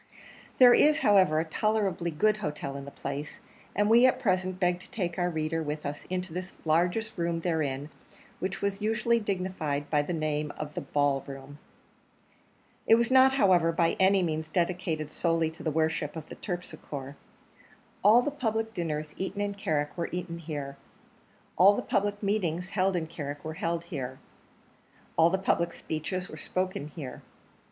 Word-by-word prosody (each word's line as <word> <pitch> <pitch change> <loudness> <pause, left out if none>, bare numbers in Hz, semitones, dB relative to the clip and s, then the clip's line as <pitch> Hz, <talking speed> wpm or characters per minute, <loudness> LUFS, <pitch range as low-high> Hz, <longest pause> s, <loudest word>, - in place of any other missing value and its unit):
There 250 -2 +9
is, 305 +1 +5
however, 185 -7 +5
a 160 - 0
tolerably 195 -1 0
good 210 +7 +2
hotel 150 -7 -4
in 140 0 -6
the - - -7
place, 140 +1 -6 0.4
and 205 0 +2
we 235 +3 +7
at 255 0 +1
present 185 -5 0
beg 180 -1 +2
to - - -12
take 180 -4 -3
our 175 0 +2
reader 160 0 -1
with 150 0 -4
us 145 +1 -5
into 180 -2 -3
the 180 +1 -5
largest 175 +8 +1
room 170 0 0
therein, 150 -4 -1 0.5
which 190 +1 -3
was 200 0 -1
usually 225 +2 +2
dignified 180 -8 -2
by 150 -2 +4
the 145 - -4
name 155 -2 -1
of 150 -1 -5
the - - -3
Ball 145 -2 +1
Room. 140 +1 -9 1.3
It 225 - +8
was 235 +2 +1
not, 265 0 +7
however, 180 -10 +4
by 165 0 +2
any 190 0 +4
means 160 -1 -2
dedicated 170 -3 -1
solely 165 -1 +1
to 160 - -13
the 160 - -1
worship 160 0 0
of 160 -1 -7
Terpsichore: 145 -7 -6 0.9
all 220 +5 +7
the 290 - -1
public 225 -5 -2
dinners 155 -4 -3
eaten 190 +2 -4
in 205 0 -1
Carrick 150 -7 -1
were 170 -2 -2
eaten 175 -1 -4
here; 145 -4 -5 0.8
all 195 +4 +7
the - - -2
public 205 +1 -1
meetings 185 -3 0
held 195 -1 +1
in 170 -2 -1
Carrick 145 -2 -6
were 160 - -4
held 165 +1 -2
here; 130 -6 -5 1.0
all 165 +1 +5
the 190 - +1
public 170 -3 0
speeches 180 +4 -4
were - - -10
spoken 185 -5 -2
here. 150 -4 -8
170 Hz, 170 wpm, -29 LUFS, 155-195 Hz, 1.3 s, There